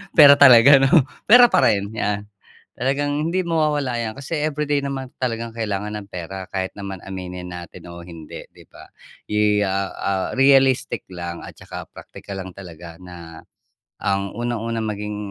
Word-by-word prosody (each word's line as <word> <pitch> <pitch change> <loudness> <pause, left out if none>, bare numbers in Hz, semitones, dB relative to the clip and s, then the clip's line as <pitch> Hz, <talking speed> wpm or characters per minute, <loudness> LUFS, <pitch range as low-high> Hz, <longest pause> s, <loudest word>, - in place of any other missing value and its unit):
Pera 145 -2 +8
talaga 135 +1 +8
‘no? 135 +2 +4 0.2
Pera 245 +1 +8
pa - - +4
rin, 100 -2 0
yan 105 -1 -3 0.4
talagang 145 +4 -1
hindi 185 - 0
mawawala 155 -7 0
‘yan 115 +2 -4
kasi 140 +4 -5
everyday 150 -1 -1
naman 135 -1 -4
talagang 115 -2 -4
kailangan 105 -1 -3
ng 105 -1 -9
pera. 95 +2 -7
Kahit 95 -1 -4
naman 100 -2 -7
aminin 90 -1 -7
natin 90 0 -10
o 85 0 -10
hindi, 85 -3 -10
‘di - - -19
ba? - - -16 0.4
Yi 105 -1 +2
ah 95 0 -2
ah, 95 -1 -2
realistic 135 -1 +3
lang 85 -2 -7
at - - -11
tsaka - - -9
practical 95 -1 -10
lang 95 - -10
talaga 85 -2 -12
na, 85 -3 -11 0.6
ang 100 0 -1
unang-unang 115 -1 -3
maging 105 0 -5
105 Hz, 155 wpm, -21 LUFS, 95-135 Hz, 0.6 s, Pera